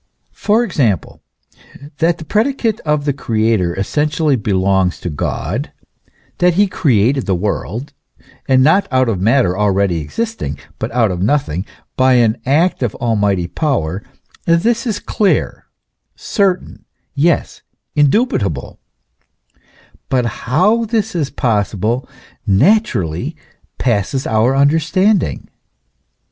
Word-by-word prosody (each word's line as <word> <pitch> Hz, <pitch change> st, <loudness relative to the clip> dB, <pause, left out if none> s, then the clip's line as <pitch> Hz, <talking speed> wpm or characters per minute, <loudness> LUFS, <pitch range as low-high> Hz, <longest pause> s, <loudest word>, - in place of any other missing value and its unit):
For 220 Hz, +3 st, +1 dB
example, 130 Hz, -, -1 dB, 0.8 s
that 165 Hz, +1 st, +2 dB
the 160 Hz, -, -9 dB
predicate 225 Hz, -, 0 dB
of 150 Hz, -2 st, -1 dB
the 145 Hz, -, +1 dB
Creator 110 Hz, -8 st, 0 dB
essentially 150 Hz, -, 0 dB
belongs 95 Hz, -4 st, +1 dB
to 90 Hz, -, -4 dB
God, 100 Hz, -, -3 dB, 0.7 s
that 175 Hz, -1 st, +3 dB
he 205 Hz, +3 st, +4 dB
created 135 Hz, -, +1 dB
the 95 Hz, -, +2 dB
world, 105 Hz, -, -3 dB, 0.5 s
and 130 Hz, -1 st, +4 dB
not 190 Hz, +8 st, +3 dB
out 130 Hz, -1 st, +2 dB
of 95 Hz, -5 st, -2 dB
matter 110 Hz, -3 st, +2 dB
already 100 Hz, -4 st, +1 dB
existing, 75 Hz, -, -4 dB, 0.2 s
but -, -, -3 dB
out 115 Hz, -4 st, +2 dB
of 90 Hz, -1 st, -4 dB
nothing, 100 Hz, -, 0 dB, 0.3 s
by 130 Hz, 0 st, +4 dB
an 115 Hz, -2 st, +2 dB
act 160 Hz, +6 st, +2 dB
of 120 Hz, -5 st, -1 dB
almighty 105 Hz, -7 st, 0 dB
power, 95 Hz, -, -1 dB, 0.5 s
this 225 Hz, +9 st, +2 dB
is 215 Hz, -4 st, -1 dB
clear, 205 Hz, -2 st, -1 dB, 0.5 s
certain 195 Hz, -4 st, -1 dB, 0.3 s
yes, 155 Hz, +3 st, 0 dB, 0.3 s
indubitable; 140 Hz, -, +1 dB, 1.3 s
but 125 Hz, -2 st, +1 dB
how 185 Hz, -, +1 dB
this 220 Hz, -1 st, -1 dB
is 150 Hz, -5 st, -1 dB
possible 115 Hz, +1 st, -1 dB, 0.4 s
naturally 120 Hz, -, +1 dB, 0.4 s
passes 120 Hz, +2 st, 0 dB
our 110 Hz, +4 st, +2 dB
understanding. 165 Hz, +7 st, +2 dB
130 Hz, 110 wpm, -16 LUFS, 100-170 Hz, 1.3 s, he